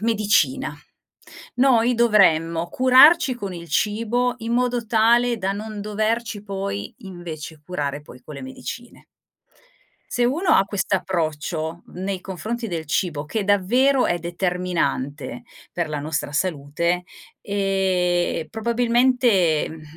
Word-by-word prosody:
medicina. 205 - +1 0.8
Noi 245 -2 +4
dovremmo 170 -8 +3
curarci 260 +3 +6
con 200 -5 -6
il 170 -1 -9
cibo 230 +4 0
in 230 0 -4
modo 245 -1 0
tale 235 +2 +3
da 195 -2 -1
non 210 +1 -6
doverci 215 +1 -2
poi 200 0 -5
invece, 165 -5 -8
curare 145 -4 -3
poi 125 -4 -14
con 150 +3 -10
le 140 - -8
medicine 235 - -8 1.1
se 245 - +1
uno 320 +7 +2
ha 195 - +4
quest'approccio 170 -4 -2
nei 190 0 -5
confronti 225 +5 -4
del 165 -5 -4
cibo, 150 -1 -1
che 210 +5 -2
davvero 245 +8 +3
è 175 - 0
determinante 170 -7 -2 0.3
per 170 -1 -2
la 150 - -3
nostra 155 0 -3
salute, 170 +2 -1 0.4
ehm, 185 -4 0
probabilmente, 235 - +2
mhmm, 160 0 -10
195 Hz, 115 wpm, -22 LUFS, 165-230 Hz, 1.1 s, curarci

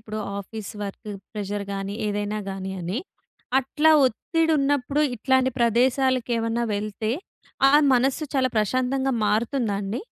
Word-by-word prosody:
ఇప్పుడు 215 -1 -6 0.2
office 200 +1 -7
work 205 +2 -6 0.2
pressure 205 -1 -3
గాని 195 0 -4
ఏదైనా 205 +1 -2
గాని 190 0 -5
అని, 180 +8 -3 0.6
అట్లా 295 +4 +2 0.2
ఒత్తిడి 325 +7 0
ఉన్నప్పుడు 280 +1 +1
ఇట్లాంటి 260 +2 +2
ప్రదేశాలకు 250 +1 +2
ఏమన్నా 230 +1 -1
వెళ్తే 215 +1 -3 0.6
ఆ - - +1 0.2
మనస్సు 265 +5 +1
చాలా 260 -1 +3
ప్రశాంతంగా 255 +5 +1
మారుతుందా 220 +1 0
అండి? 200 +4 -3
230 Hz, 125 wpm, -24 LUFS, 205-260 Hz, 0.6 s, చాలా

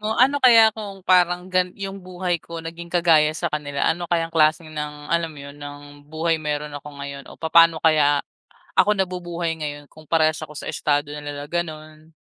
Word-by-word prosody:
mo, 215 +1 -2
ano 275 +4 +4
kaya 230 -4 +7
kung 200 -3 -9
parang 180 -1 +3
gan 185 0 +2
yung 195 0 -6
buhay 180 -1 -3
ko 165 -1 -8
naging 170 +1 -7
kagaya 170 -3 +4
sa 170 0 -3
kanila? 145 -2 -2
Ano 175 +1 0
kayang 165 -1 0
klaseng 155 0 +2
ng 150 -1 -4 0.2
alam 170 -1 +1
iyon 140 +1 -11
ng, 145 0 -10
buhay 160 +1 0
meron 150 -1 -3
ako 145 0 -8
ngayon 140 0 -7
o - - -12
papaano 165 0 +5
kaya, 145 -3 +4 0.5
ako 210 - +5
nabubuhay 175 -3 -3
ngayon 145 -1 -6
kung 155 0 -16
parehas 155 0 +2
ako 155 -1 -8
sa 145 - -5
estado 145 0 0
na 150 - -6
nila, 145 0 -7
ganon. 155 -2 -5
160 Hz, 185 wpm, -22 LUFS, 150-175 Hz, 0.5 s, kaya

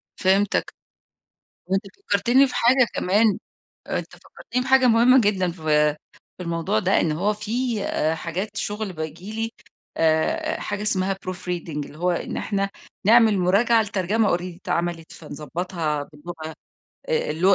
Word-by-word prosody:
فهمتك. 195 +2 +1 0.9
وأنت 190 +1 0 0.2
فكرتني 240 +7 +4
في - - -7
حاجة 245 +1 +4
كمان 205 +2 +2 0.5
أنت - - -3
فكرتيني 250 +2 -5
في 260 - -6
حاجة 265 -1 +6
مهمة 240 +2 +6
جدًا، 190 -4 +1
في 150 -3 +2 0.4
في 180 - -6
الموضوع 165 -9 0
ده، - - +2
إن 160 - +1
هو 195 +7 0
في 225 +1 -2
آآ، 160 +1 0
حاجات 190 +6 -4
شغل 205 -2 -3
باجي 160 +5 -6
لي 225 +1 -3 0.5
آآ، 165 - +1
آآ، - - -6
حاجة 205 0 -4
اسمها 195 -2 0
proof 185 -1 -6
reading 180 -2 -5 0.2
اللي 150 - -13
هو 180 +1 +1
إن 175 - -3
إحنا 195 -1 -1 0.4
نعمل 225 -2 +6
مراجعة 210 +6 +3
لترجمة 205 -1 +1
already 180 -1 -7
اتعملت، 170 -2 -2
فنضبطها 155 0 -4
باللغة 160 +1 -8 0.6
آآ، 470 - 0
الل 160 +3 -6
190 Hz, 145 wpm, -23 LUFS, 170-220 Hz, 0.9 s, حاجة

